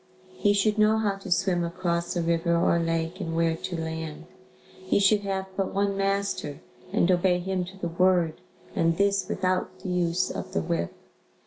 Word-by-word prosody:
He 205 - +2
should 210 +1 +2
know 215 +1 +5
how 205 -3 0
to 195 -1 -9
swim 175 0 +2
across 170 0 -2
a 175 - 0
river 170 0 +1
or 170 0 +3
lake 165 +2 -1
and 165 -3 -3
where 165 0 +2
to 170 +1 -5
land. 160 -1 -5 0.6
He 185 - +1
should 200 +1 +4
have 195 -1 -2
but 195 -1 -2
one 200 0 +1
master 195 -7 -1 0.3
and 180 - +3
obey 180 0 +3
him 185 0 -2
to 190 +2 -11
the 180 - -3
word 175 -2 +2 0.3
and 165 0 +2
this 200 -1 +1
without 185 0 -1
the 185 - -5
use 180 0 +1
of - - -6
the 80 - +1
whip. 85 +1 -1
180 Hz, 185 wpm, -26 LUFS, 165-195 Hz, 0.6 s, know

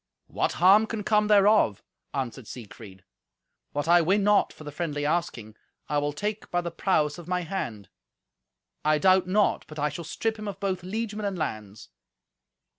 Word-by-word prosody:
"What - - -1
harm 195 +6 +5
can 220 -2 -4
come 210 +1 +2
thereof?" 205 - +4 0.3
answered 130 -3 -4
Siegfried. 105 -5 -11 0.7
"What 145 +2 -3
I 175 +1 +6
win 195 +5 +2
not 205 0 +3
for - - -13
the 150 - -7
friendly 145 -2 -3
asking, 145 -10 -2 0.3
I 145 - +1
will 145 0 -1
take 205 +8 -4
by 175 - 0
the 170 -1 -5
prowess 160 -3 0
of 170 - -11
my 180 0 0
hand. 120 - -5 1.0
I 155 0 +3
doubt 185 +2 +4
not 205 +2 +2
but 155 - -11
I 150 0 0
shall 155 +4 -7
strip 220 +7 -3
him 215 - -6
of 200 - -6
both 190 -2 -2
liegemen 210 +3 -4
and 195 -2 -3
lands." 110 - -5
175 Hz, 175 wpm, -26 LUFS, 145-200 Hz, 1.0 s, I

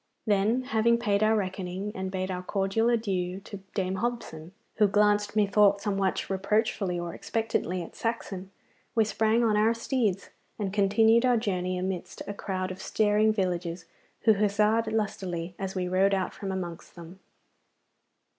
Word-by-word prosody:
Then, 215 +4 +2
having 235 -2 +2
paid 210 -4 +1
our 215 +1 +4
reckoning 190 0 -3
and 190 0 -3
bade 185 0 -3
a 180 0 -3
cordial 195 +4 0
adieu 190 -6 -1
to 200 0 -8 0.2
Dame 190 -1 -1
Hobson, 210 -8 -4 0.3
who 210 - +5
glanced 205 +1 +2
methought 205 -1 +4
somewhat 195 -2 -1
reproachfully 195 -1 0
or 170 -1 -4
expectantly 205 -5 -2
at - - -12
Saxon, 195 -5 -4 0.5
we 225 -2 +4
sprang 220 +2 +2
on 220 -2 +3
our 220 +2 +3
steeds 230 -5 -1 0.3
and 195 -3 -3
continued 220 +3 +4
our 250 -2 +4
journey 185 -4 -1
amidst 185 -1 -4
a 205 - -3
crowd 185 -2 -3
of 185 - -8
staring 215 0 +2
villagers, 180 -4 -2 0.4
who 220 - +5
huzzaed 210 +2 +2
lustily 190 -5 -2
as 195 -1 -4
we 180 -1 -1
rode 190 +2 +3
out 190 -2 -2
from 195 -2 -5
amongst 175 -3 -6
them. 170 +2 -11
200 Hz, 155 wpm, -28 LUFS, 185-220 Hz, 0.5 s, who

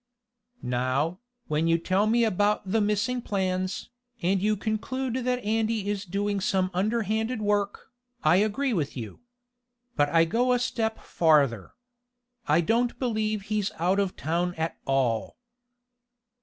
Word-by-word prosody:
"Now, 130 +8 0 0.3
when 155 +2 0
you 165 0 +4
tell 190 +5 +1
me 235 +2 +3
about 210 -1 +1
the 225 +1 +3
missing 210 +4 0
plans, 185 0 -2 0.3
and 190 +2 +2
you 210 +1 +1
conclude 230 +5 -2
that 250 0 -1
Andy 220 -1 0
is 205 -1 -3
doing 200 +2 -1
some 190 -1 0
underhanded 220 +4 0
work, 205 +3 -1 0.3
I 155 +3 +5
agree 220 +6 +1
with 150 -8 -2
you. 110 -4 -7 0.8
But 145 -1 +2
I 165 +1 +4
go 245 +8 +2
a - - +3
step 225 -2 -1
farther. 140 - +2 0.7
I 155 +3 +4
don't 235 +7 +1
believe 215 -4 -1
he's 210 -1 -1
out 180 +4 +1
of 195 -2 0
town 175 +3 -1
at 160 +1 -2
all." 130 -5 0
200 Hz, 140 wpm, -27 LUFS, 165-220 Hz, 0.8 s, I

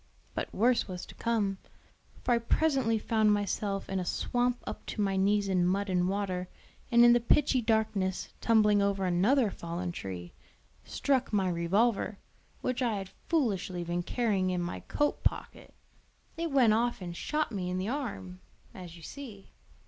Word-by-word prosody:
But - - -4
worse 240 +4 +2
was 180 -2 -6
to - - -13
come; 205 -5 -1 0.6
for - - 0
I 235 - +4
presently 255 -2 +1
found 215 0 +2
myself 205 -1 -1
in 190 0 -2
a - - -1
swamp 245 +6 -1
up - - -6
to - - -5
my 195 -2 +1
knees 200 +1 +2
in 185 -2 +2
mud 195 +2 0
and 180 0 +2
water, 190 -2 -2 0.4
and 235 0 +7
in 240 - +8
the 240 - +4
pitchy 260 +2 +3
darkness 215 -4 0
tumbling 210 -3 +4
over 200 -1 +1
another 205 +7 +3
fallen 170 +1 -4
tree, 90 - -7 0.5
struck 270 -2 0
my 195 -3 +2
revolver, 195 +5 +1 0.4
which 255 0 -1
I 235 -4 +1
had 195 -2 -5 0.2
foolishly 200 - 0
been 175 +1 -2
carrying 195 -2 0
in 180 -1 -1
my 175 0 -3
coat 295 0 -1
pocket: - - -2 0.6
it 335 0 -2
went 255 -6 +4
off 240 +2 +1
and 175 -2 -6
shot 305 - -1
me 185 -4 -3
in 180 - -2
the 190 +3 -2
arm, 205 -9 -4 0.3
as 175 -2 -10
you 165 - -14
see. 225 - -10
205 Hz, 170 wpm, -30 LUFS, 185-235 Hz, 0.6 s, in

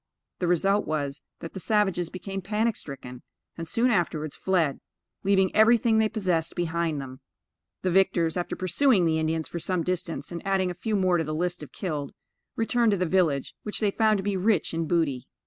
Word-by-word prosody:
The 180 - 0
result 195 +4 +2
was, 145 -2 -2 0.2
that 165 - -7
the 190 - -6
savages 190 -3 +1
became 195 +2 -6
panic 215 +3 0
stricken, 125 -3 -9 0.3
and 165 0 -6
soon 240 +8 +2
afterwards 160 -6 -1
fled, 170 -7 0 0.4
leaving 190 -1 +2
everything 220 +1 +5
they 220 -1 +3
possessed 180 -7 -1
behind 170 -3 -1
them. 130 -1 -8 0.6
The 185 - +1
victors, 170 -3 +2
after 175 - -2
pursuing 185 - +3
the 160 -1 +2
Indians 160 0 -1
for 170 - -5
some 170 +1 0
distance, 180 -2 -3
and 170 - -5
adding 190 -2 +1
a - - -4
few 215 +4 -2
more 185 -3 +3
to - - +1
the 155 0 -3
list 175 +1 -1
of 150 - -9
killed, 150 -7 -4 0.4
returned 225 -1 +2
to - - +1
the 185 - 0
village, 160 -6 +1
which 210 - -4
they 210 -2 +2
found 215 0 +3
to 190 - -4
be 200 0 -1
rich 190 -3 +1
in 165 0 -1
booty. 150 -8 0
180 Hz, 195 wpm, -26 LUFS, 160-200 Hz, 0.6 s, everything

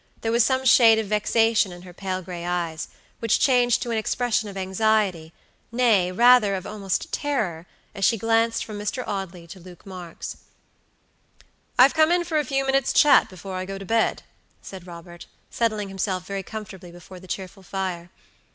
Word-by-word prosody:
There 225 - -1
was 235 0 +4
some 260 +2 0
shade 230 -3 +6
of 220 - -1
vexation 215 0 +2
in 175 0 -11
her 180 -1 -12
pale 185 0 -4
gray 175 -1 -7
eyes, 170 -2 -3 0.3
which 230 -2 +1
changed 245 -3 +3
to 240 - -4
an 225 - 0
expression 220 -1 -1
of 195 - -10
anxietynay, 195 +1 0
rather 235 0 +5
of 185 - -6
almost 200 -2 -3
terroras 215 - -2 0.3
she 225 +4 +3
glanced 225 +1 +1
from 210 -2 -7
Mr. 230 +5 -3
Audley 190 -4 -5
to 180 +3 -12
Luke 180 -1 -15
Marks. 180 -3 -8 1.4
"I 250 - +9
have 270 - +5
come 315 +1 +4
in 350 0 +2
for 325 -3 -1
a - - 0
few 270 +1 -1
minutes' 270 -1 +1
chat 295 -2 +5
before 190 +1 -9
I 185 0 -4
go 195 +1 -6
to 195 - -9
bed," 225 +3 0 0.4
said 185 -2 -11
Robert, 175 0 -11 0.2
settling 215 -4 -1
himself 190 -1 -3
very 195 0 -4
comfortably 195 -3 -9
before 175 +1 -13
the 185 - -14
cheerful 190 +1 -6
fire. 185 -2 -5
200 Hz, 175 wpm, -24 LUFS, 185-230 Hz, 1.4 s, I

